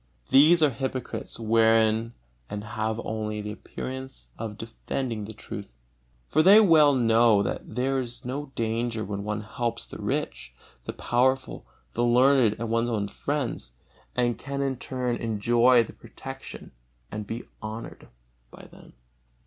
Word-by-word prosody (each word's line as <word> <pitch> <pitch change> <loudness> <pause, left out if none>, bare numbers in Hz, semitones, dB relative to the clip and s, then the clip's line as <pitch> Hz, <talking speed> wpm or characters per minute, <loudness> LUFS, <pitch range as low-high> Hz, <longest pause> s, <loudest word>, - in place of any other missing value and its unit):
These 155 +5 +6
are 150 - +5
hypocrites 130 0 -4
within 115 0 +3 0.4
and 105 0 -5
have 110 +1 -3
only 110 -1 -3
the 105 0 -5
appearance 130 +4 -7
of 110 -2 -6
defending 115 0 -4
the 110 - -7
truth. 100 - -8 0.6
For 155 - +3
they 195 +6 +8
well 155 -8 +6
know 115 -3 +4
that - - -5
there 135 +2 +1
is 120 -1 -5
no 135 +2 -4
danger 115 0 -1
when 100 0 -4
one 105 0 -2
helps 115 +2 -3
the - - -10
rich, 60 -1 -3 0.3
the - - -4
powerful, 130 - 0 0.3
the 120 - 0
learned 125 -1 +4
and 115 0 -4
one's 115 +1 +1
own 105 -3 -1
friends, 140 - -3 0.4
and 120 -1 +1
can 140 0 -3
in 135 -2 -1
turn 125 -1 -2
enjoy 120 +2 +3
their - - -11
protection - - -10 0.4
and 105 0 -5
be 115 +2 -5 0.2
honored 110 +1 -7 0.4
by - - -13
them. - - -16
115 Hz, 145 wpm, -26 LUFS, 110-130 Hz, 0.6 s, they